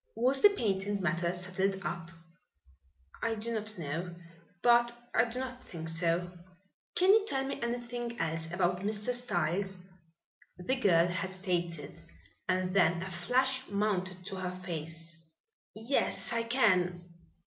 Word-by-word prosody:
"Was 255 Hz, +4 st, +2 dB
the 415 Hz, -, +10 dB
patent 205 Hz, -, -1 dB
matter 170 Hz, -1 st, +1 dB
settled 190 Hz, +2 st, -1 dB
up?" 170 Hz, -1 st, -3 dB, 1.1 s
"I 230 Hz, 0 st, 0 dB
do 225 Hz, +2 st, -2 dB
not 215 Hz, -1 st, -3 dB
know, 170 Hz, +3 st, -4 dB, 0.5 s
but 240 Hz, 0 st, +6 dB, 0.2 s
I 225 Hz, -, +5 dB
do 235 Hz, +1 st, -5 dB
not 255 Hz, 0 st, -4 dB
think 165 Hz, -6 st, -6 dB
so." 170 Hz, +1 st, +1 dB, 0.6 s
"Can 370 Hz, +2 st, +6 dB
you 440 Hz, -1 st, +5 dB
tell 270 Hz, -5 st, 0 dB
me 275 Hz, -, -4 dB
anything 240 Hz, 0 st, -3 dB
else 165 Hz, 0 st, -1 dB
about 180 Hz, 0 st, +1 dB
Mr. 210 Hz, +4 st, 0 dB
Styles?" 190 Hz, -5 st, -1 dB, 0.8 s
The 180 Hz, +9 st, 0 dB
girl 175 Hz, -9 st, +4 dB
hesitated 175 Hz, -4 st, -2 dB, 0.5 s
and 185 Hz, 0 st, +1 dB
then 170 Hz, -2 st, +4 dB
a 190 Hz, -, -6 dB
flush 260 Hz, +9 st, +1 dB
mounted 190 Hz, -3 st, -1 dB
to 195 Hz, -1 st, -4 dB
her 180 Hz, -1 st, -3 dB
face. 165 Hz, 0 st, -6 dB, 0.6 s
"Yes, 230 Hz, +2 st, 0 dB
I 230 Hz, 0 st, 0 dB
can. 185 Hz, -8 st, +3 dB
190 Hz, 135 wpm, -32 LUFS, 175-235 Hz, 1.1 s, the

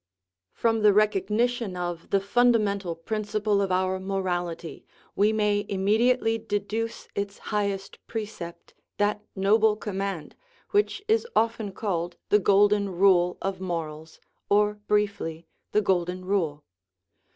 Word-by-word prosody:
From 225 Hz, -1 st, +1 dB
the 210 Hz, -1 st, +6 dB
recognition 210 Hz, +1 st, +1 dB
of 175 Hz, -1 st, -4 dB
the 195 Hz, -, +3 dB
fundamental 200 Hz, -4 st, +2 dB
principle 210 Hz, +3 st, -1 dB
of 195 Hz, -1 st, -1 dB
our 185 Hz, +1 st, +1 dB
morality 180 Hz, -3 st, -3 dB, 0.3 s
we 210 Hz, +2 st, +3 dB
may 210 Hz, -1 st, +1 dB
immediately 225 Hz, +4 st, +2 dB
deduce 220 Hz, +1 st, -3 dB
its 200 Hz, 0 st, -3 dB, 0.2 s
high 205 Hz, -1 st, +2 dB
est 195 Hz, 0 st, -7 dB
precept, 210 Hz, -6 st, -7 dB, 0.2 s
that 205 Hz, 0 st, +1 dB
noble 210 Hz, +2 st, +4 dB
command, 195 Hz, -5 st, -4 dB, 0.4 s
which 410 Hz, -1 st, +1 dB
is 450 Hz, +2 st, +2 dB
often 225 Hz, -2 st, +1 dB
called 175 Hz, -4 st, -3 dB
the 210 Hz, -, +5 dB
Golden 200 Hz, +1 st, +4 dB
Rule 180 Hz, -1 st, +3 dB
of 190 Hz, -1 st, -3 dB
morals, 160 Hz, -3 st, -5 dB, 0.3 s
or, 210 Hz, +1 st, +3 dB
briefly, 200 Hz, -6 st, 0 dB, 0.3 s
the 210 Hz, -, +3 dB
Golden 180 Hz, -1 st, 0 dB
Rule. 165 Hz, -7 st, -1 dB
200 Hz, 120 wpm, -26 LUFS, 185-215 Hz, 0.4 s, the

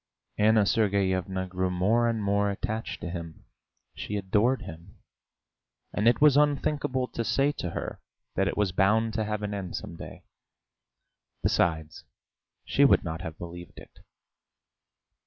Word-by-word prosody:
Anna 110 Hz, 0 st, +5 dB
Sergeyevna 95 Hz, -2 st, +1 dB
grew 95 Hz, 0 st, -2 dB
more 105 Hz, +7 st, +2 dB
and 115 Hz, -2 st, -1 dB
more 100 Hz, 0 st, +2 dB
attached 110 Hz, +3 st, -4 dB
to 85 Hz, -, -4 dB
him. 85 Hz, -3 st, -8 dB, 0.5 s
She 105 Hz, -, -4 dB
adored 105 Hz, +6 st, +1 dB
him, 85 Hz, +4 st, -11 dB, 1.0 s
and 105 Hz, -, +1 dB
it 120 Hz, -, +4 dB
was 150 Hz, -2 st, +6 dB
unthinkable 145 Hz, -3 st, +1 dB
to 115 Hz, -, -3 dB
say 140 Hz, +5 st, +2 dB
to 90 Hz, -, -2 dB
her -, -, -5 dB, 0.3 s
that 95 Hz, 0 st, +1 dB
it -, -, -2 dB
was 105 Hz, -3 st, +1 dB
bound 110 Hz, +4 st, +2 dB
to 110 Hz, -, 0 dB
have 105 Hz, 0 st, -3 dB
an 105 Hz, 0 st, -3 dB
end 95 Hz, -3 st, -5 dB
some 85 Hz, -, -6 dB
day; -, -, -10 dB, 1.2 s
besides, 80 Hz, -2 st, 0 dB, 0.6 s
she -, -, +3 dB
would -, -, +5 dB
not 80 Hz, 0 st, -4 dB
have 80 Hz, -3 st, -6 dB
believed 85 Hz, 0 st, -9 dB
it! -, -, -14 dB
100 Hz, 145 wpm, -27 LUFS, 90-110 Hz, 1.2 s, was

